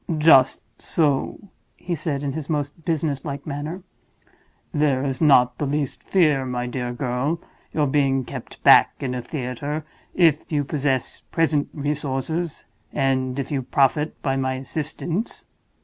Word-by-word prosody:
"Just 150 -4 +5 0.2
so," 145 -5 +1 0.4
he 175 - -4
said, 150 -3 -2
in 140 -1 -2
his 155 0 -5
most 150 +1 -3
business 155 -4 -1
like 140 -1 -5
manner. 155 +5 -5 0.9
"There 145 -4 +2
is 135 +1 -2
not 125 -5 +5
the 145 - 0
least 145 -1 -2
fear, 155 -8 +3
my 125 -1 -2
dear 125 0 -3
girl, 125 +4 -1
of 170 - -5 0.3
your 150 - +1
being 135 -2 +2
kept - - -9
back - - +7
in 130 -2 -2
a 125 - -3
theater, 145 +3 -4 0.3
if 165 -4 +3
you 145 -2 +1
possess 135 -3 -1
present 155 -3 +1
resources, 150 +2 -2 0.3
and 130 -1 0
if 135 0 -3
you 140 -2 0
profit 145 +3 +1
by 135 -1 +1
my 130 -1 0
assistance." 160 - -4
145 Hz, 150 wpm, -23 LUFS, 130-155 Hz, 0.9 s, back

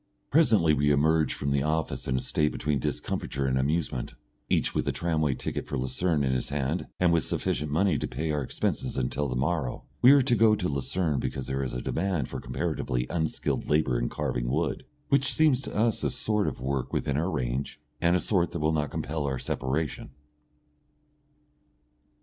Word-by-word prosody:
Presently 110 - +5
we 75 0 +2
emerge 75 +2 +3
from 70 - -2
the 70 0 +2
office 80 +2 -1
in 65 - +1
a - - +1
state 75 +3 0
between 75 -2 -1
discomfiture 70 +2 -2
and 65 -1 +1
amusement, 65 -3 -1 0.3
each - - +1
with - - -1
a - - +3
tramway 80 -5 0
ticket - - -4
for - - -3
Lucerne 70 +5 0
in 65 - +1
his 65 - -2
hand 70 +4 -1
and 90 -2 +4
with 85 - +3
sufficient 75 0 -2
money 85 +1 +2
to - - -2
pay 75 +5 -2
our 75 -1 0
expenses 65 - -2
until 65 +3 -1
the 65 - -3
morrow. 70 -1 -1 0.2
We 130 +3 +9
are 140 -2 +6
to 125 -2 +2
go 110 -1 +5
to 90 - -2
Lucerne 75 +2 -1
because 65 +1 -3
there 65 - -2
there 70 - -1
is 60 - -4
a 60 - -2
demand 85 -6 -1
for - - -5
comparatively 60 0 -2
unskilled 80 -3 -1
labour 75 -5 +2
in - - -1
carving - - -2
wood, 80 - -1 0.2
which 140 -1 +3
seems 145 -2 +3
to - - -7
us 110 +1 +1
a - - +2
sort 110 -4 0
of - - -3
work 65 0 -2
within 70 - -1
our 80 +6 0
range 65 -3 -2 0.2
and 85 +1 +4
a - - +3
sort 90 -2 +1
that 85 - -2
will 75 +1 +1
not 75 -2 0
compel 75 -2 -3
our 65 -1 -1
separation. 70 +5 -2
75 Hz, 195 wpm, -28 LUFS, 65-85 Hz, 0.3 s, We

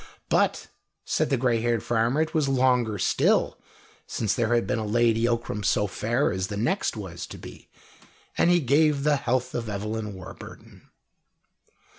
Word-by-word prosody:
But, - - +1 0.4
said - - 0
the 135 - +2
grey 120 -2 +1
haired 115 -2 0
farmer, 120 +6 +1
it 160 - -7
was 155 -4 +1
longer 125 -5 +2
still - - +1 0.5
since 105 -4 -1
there 120 0 +1
had 120 - +1
been 125 - -1
a - - -2
Lady 115 +1 +2
Ockram 115 -3 -2
so 105 +2 +2
fair 115 +7 0
as 95 0 -2
the 105 -2 -5
next 120 - -1
was 90 -5 -7
to - - -9
be, - - -12 0.7
and - - +3
he 175 -1 +4
gave 145 +1 +2
the 150 -1 +3
health 125 0 -1
of 115 -2 -3
Evelyn 105 +1 -4
Warburton. 95 0 -12
120 Hz, 165 wpm, -25 LUFS, 105-130 Hz, 0.7 s, he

